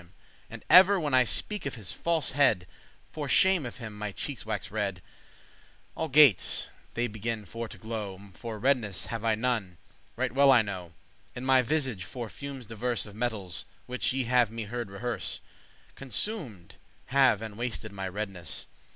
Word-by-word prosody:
*paineth 85 - -19 0.4
And - - -10
ever, 190 +2 +8
when 150 -4 -2
I 130 -1 +6
speak 210 - -1
of 140 - -5
his 110 -6 -3
falsehead, 140 - +2 0.5
For 150 -2 -4
shame 185 -6 +4
of 120 - -9
him 110 -4 -7
my 105 0 -4
cheekes 130 +4 -5
waxe 105 -3 -3
red; 100 -4 -2 0.9
Algates* 150 - +5 0.3
they 120 - +1
beginne 110 0 -4
for 115 +5 -5
to - - -11
glow, 110 -3 -5
*at - - -15
least 100 -4 -16
For 115 -2 -6
redness 110 -5 +1
have 115 -1 -5
I 115 -1 +3
none, 110 -6 -1 0.4
right 130 0 0
well 140 +2 +6
I 120 -4 +6
know, 90 -4 -6 0.4
In 125 +1 -5
my 130 -1 +5
visage; 130 -7 -1
for 115 +5 -6
fumes 140 -1 -7
diverse 115 +2 -2
Of 105 - -11
metals, 110 -6 -2 0.2
which 125 +1 -1
ye 130 0 0
have 120 -1 +3
me 115 0 -5
heard 120 0 -5
rehearse, 105 0 -3 0.5
Consumed 135 - -4 0.4
have 130 -6 +5
and 110 -2 -7
wasted 115 -2 -3
my 95 -1 -4
redness. 95 -2 -4
115 Hz, 170 wpm, -29 LUFS, 105-130 Hz, 0.9 s, ever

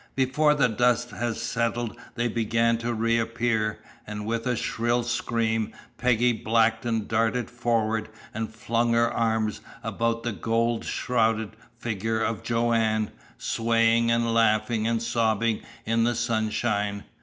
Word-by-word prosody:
Before 145 +3 +3
the 140 -4 +4
dust 120 +1 +1
had 120 -1 -2
settled 115 0 -2 0.2
they 120 0 0
began 115 0 +1
to 120 +1 -2
reappear, 115 -1 0 0.3
and 105 0 -5
with 115 +2 -2
a 125 - +1
shrill 120 +2 0
scream 115 -2 -1 0.3
Peggy 125 0 +3
Blackton 115 0 +1
darted 115 +2 0
forward 115 -3 0 0.2
and 110 0 -3
flung 115 +1 0
her 115 0 +3
arms 110 -2 0 0.2
about 115 0 -1
the 120 - -1
gold 115 +2 0
shrouded 110 -3 0 0.2
figure 110 -1 -2
of 110 0 -1
Joanne, 115 -2 +1 0.3
swaying 115 0 +2
and 115 0 +2
laughing 110 0 +2
and 115 0 0
sobbing 115 -1 +1 0.2
in 115 +1 +2
the 120 +1 +1
sunshine. 110 -3 -1
115 Hz, 130 wpm, -26 LUFS, 110-120 Hz, 0.3 s, the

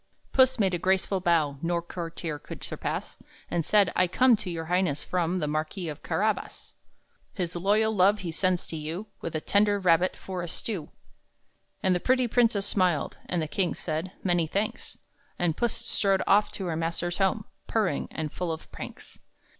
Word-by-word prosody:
Puss 260 -1 +5
made 195 -4 +2
a 175 - 0
graceful 190 +1 +1
bow 160 -6 +2
No 170 0 0
courtier 170 -2 -5
could - - -9
surpass, - - -4 0.3
And 175 -1 +1
said, 200 +2 +4
"I 180 - +4
come 250 +7 +5
to 205 -3 -5
your 165 -2 -4
Highness 175 -4 +1
from 180 0 0
The 155 -4 -1
Marquis 155 +4 -2
of 150 0 -7
Carabas. 215 +2 -2 0.6
His 180 -2 -3
loyal 210 +5 +2
love 200 +2 +5
he 175 -3 -3
sends 180 +1 +1
to - - -6
you, 160 +6 -4 0.2
With 165 - -4
a 155 - -1
tender 205 +2 +3
rabbit 180 -1 +3
for 185 -2 -5
a 175 - -4
stew." 175 -1 -4 0.9
And 185 - +4
the 180 - +1
pretty 255 +4 +2
princess 230 -4 +3
smiled, 180 -8 +1
And 175 -3 0
the - - -3
king 180 +3 0
said, 160 +3 -3
"Many 175 -3 +2
thanks." 200 +6 -3 0.4
And 170 -3 +1
Puss 240 +2 +1
strode 195 -1 +1
off 205 +2 +4
to 195 - -5
her 170 -2 -1
master's 170 +2 -2
home, 195 +2 +1 0.2
Purring, 205 -10 0
and 155 -2 -4
full 180 -2 -2
of 160 - -7
pranks. - - -9
180 Hz, 180 wpm, -27 LUFS, 165-200 Hz, 0.9 s, Puss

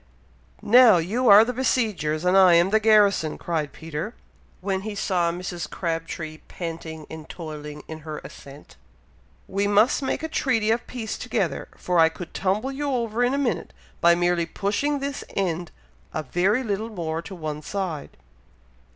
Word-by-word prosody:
"Now, 235 -3 +7
you 220 +9 +1
are 205 +2 +9
the 250 - -2
besiegers, 205 - 0
and 180 +1 +3
I 185 -3 +7
am 175 +3 +4
the 220 - +4
garrison!" 205 -7 +4
cried 155 -4 -2
Peter, 165 - -6 0.4
when 190 0 -2
he 210 +1 -5
saw 180 -4 +1
Mrs. 175 -3 -5
Crabtree 165 -2 -4
panting 165 -2 -6
and 160 -1 -10
toiling 150 -3 -8
in 160 0 -7
her 155 -1 -7
ascent. 140 - -13 0.7
"We 200 +1 0
must 210 +8 +3
make 270 - -2
a - - -1
treaty 235 -8 +1
of 230 +1 -1
peace 230 -3 -5
together, - - -2
for 180 -1 0
I 160 0 +6
could 170 +1 -9
tumble 210 +8 0
you 285 +1 -3
over 235 -2 0
in 250 +2 +2
a - - -1
minute, 270 -4 -1 0.3
by 170 0 +5
merely 175 -1 +1
pushing 215 +12 -1
this 280 -1 -4
end 175 -3 -1 0.5
a 155 - -1
very 190 - +1
little 215 0 -2
more 165 -6 -3
to 190 - -9
one 155 -3 -5
side!" 180 -3 -4
185 Hz, 165 wpm, -24 LUFS, 165-220 Hz, 0.7 s, are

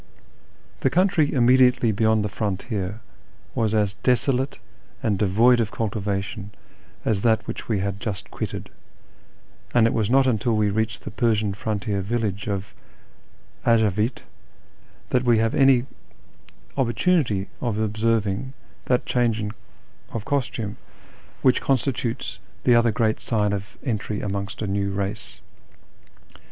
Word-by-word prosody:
The 135 - +2
country 165 -1 +3
immediately 125 -1 +4
beyond 110 0 +2
the - - +1
frontier 105 0 -3 0.5
was 110 -1 0
as 105 -2 +2
desolate 130 +3 +1 0.5
and 105 -4 +1
devoid 115 +5 +4
of 110 -2 +1
cultivation 100 -1 -3 0.6
as 105 -3 +1
that 110 -1 +2
which - - -6
we 105 -4 +1
had 100 0 -2
just 100 -3 -5
quitted, - - -5 1.0
and 120 -2 +6
it 115 - +2
was 110 -3 0
not 135 +2 +5
until 115 -2 +1
we 105 -1 +2
reached 110 +1 -1
the - - -6
Persian 110 -4 +1
frontier 100 -1 -2
village 105 -1 -2
of 100 -3 -3 0.9
Avajik 110 0 +2 0.9
that 125 - +3
we 120 -2 +4
had 110 0 +1
any 135 -2 +5 0.9
opportunity 120 - +1
of 115 -4 -1
observing 110 +2 0 0.3
that 125 -1 +1
change 115 -4 +1 0.6
of 115 -2 -5
costume 120 -7 -2 0.7
which 130 -1 +4
constitutes 130 -2 -1 0.2
the 125 - +5
other 120 -1 +4
cjreat 110 +1 +1
siu'u 105 -3 0
of 100 0 -5
entry 105 -4 -2
amongst 100 +1 -3
a - - 0
new 100 0 -1
race. 100 +2 -4
110 Hz, 125 wpm, -24 LUFS, 100-120 Hz, 1.0 s, and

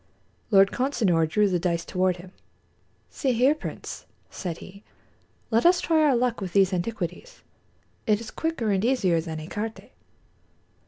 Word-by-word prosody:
Lord 195 -2 +5
Consinor 205 - +1
drew 210 +5 +3
the 180 -2 0
dice 170 -1 -1
toward 185 -1 0
him. 180 +1 -12 0.8
"See 265 -3 0
here, 255 +5 +4
Prince," 310 - -8 0.2
said 175 -4 -5
he, 200 +1 -12 0.7
"let 225 +1 +3
us 350 +1 +5
try 320 -2 +2
our 295 -4 +4
luck 240 -2 0
with 185 -3 -5
these 195 -1 +4
antiquities. 185 - -4 0.6
It 210 -1 +3
is 225 -1 -8
quicker 320 -10 -2
and 195 0 +1
easier 195 -10 +2
than 160 -1 -6
écarté." 210 +8 -6
205 Hz, 150 wpm, -25 LUFS, 180-245 Hz, 0.8 s, Lord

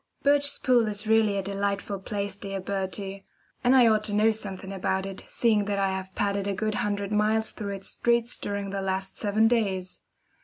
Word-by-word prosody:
Birchespool 280 -4 +3
is 210 +1 -3
really 215 -2 +3
a 195 - -1
delightful 200 0 -2
place, 200 0 -3
dear 195 -1 -5
Bertie; 195 0 -4 0.4
and 250 +2 +5
I 250 -2 +7
ought 215 -1 +3
to 205 - -1
know 215 +2 +4
something 195 -3 -5
about 190 0 -1
it, 195 -1 -6
seeing 215 -4 +2
that 200 0 -1
I 195 -1 +1
have 190 0 -5
padded 200 -1 0
a 200 - -1
good 215 +2 -1
hundred 205 -1 -2
miles 215 +1 +2
through 200 -2 -5
its 195 - -4
streets 235 0 +1
during 200 -1 -3
the 195 0 -2
last 190 0 -3
seven 215 +1 +3
days. 195 -6 0
200 Hz, 190 wpm, -27 LUFS, 195-220 Hz, 0.4 s, I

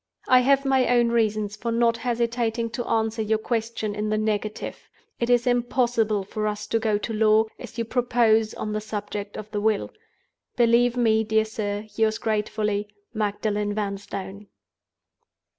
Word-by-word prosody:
"I 255 - +7
have 275 +2 +3
my 265 -1 +3
own 240 -1 +3
reasons 215 -3 0
for 230 +2 -3
not 230 0 +2
hesitating 235 -1 -1
to 240 0 -4
answer 225 0 0
your 220 0 +1
question 220 -1 -2
in 210 +1 -2
the 215 - +1
negative. 215 0 -3 0.3
It 235 - -1
is 245 -1 +4
impossible 240 -4 +1
for 215 +2 -3
us 210 0 -3
to 225 - +2
go 220 -2 +1
to 225 +2 -4
law, 215 0 +4
as - - -10
you 230 - -1
propose, 230 -2 +2
on 215 - -4
the 215 - -2
subject 205 -1 -5
of 215 0 -8
the 205 - -2
Will. 215 -1 0 0.6
"Believe 240 +1 +3
me, 220 -2 +3
dear 220 0 +2
sir, 210 -1 -4
yours 220 0 +1
gratefully, 210 -1 -1 0.3
"MAGDALEN 210 -1 -1
VANSTONE." 200 -1 -5
220 Hz, 160 wpm, -25 LUFS, 210-235 Hz, 0.6 s, I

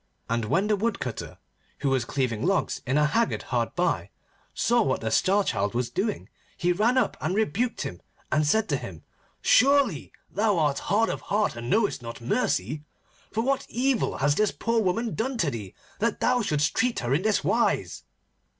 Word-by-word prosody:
And 115 -1 -1
when 180 - +1
the 210 0 +2
Woodcutter, 200 - -3 0.4
who 140 - +1
was 130 -3 +1
cleaving 125 -4 -1
logs 190 +3 0
in 135 +3 +2
a 150 - +4
haggard 230 +10 +1
hard - - -2
by, - - 0 0.4
saw 240 0 +2
what 130 -11 +1
the 110 -1 -2
Star 200 - +3
Child 100 - -1
was 120 -1 -1
doing, 210 +2 -2 0.3
he 180 -1 +1
ran 220 +8 +2
up - - +2
and 165 +5 -1
rebuked 220 +4 0
him, 90 - -6 0.3
and 155 - +3
said 220 +7 +2
to - - +1
him: - - -9 0.4
'Surely 270 - +4 0.2
thou 205 -1 +1
art 145 -3 +1
hard 220 +3 +3
of - - -3
heart 210 - 0
and 120 0 -6
knowest 210 - +1
not 115 -1 -7
mercy, 120 +3 -1 0.5
for 225 - -1
what 275 +2 0
evil 255 0 0
has 145 +1 +2
this 210 +6 +2
poor 230 0 0
woman 220 +4 0
done 250 +4 -2
to 165 -10 +1
thee 105 -6 -7 0.2
that 230 +1 0
thou 250 -1 +2
shouldst 150 -8 +1
treat 250 -2 +1
her 120 +1 0
in 150 - +2
this 215 +1 +1
wise? - - +1
190 Hz, 185 wpm, -26 LUFS, 135-225 Hz, 0.5 s, a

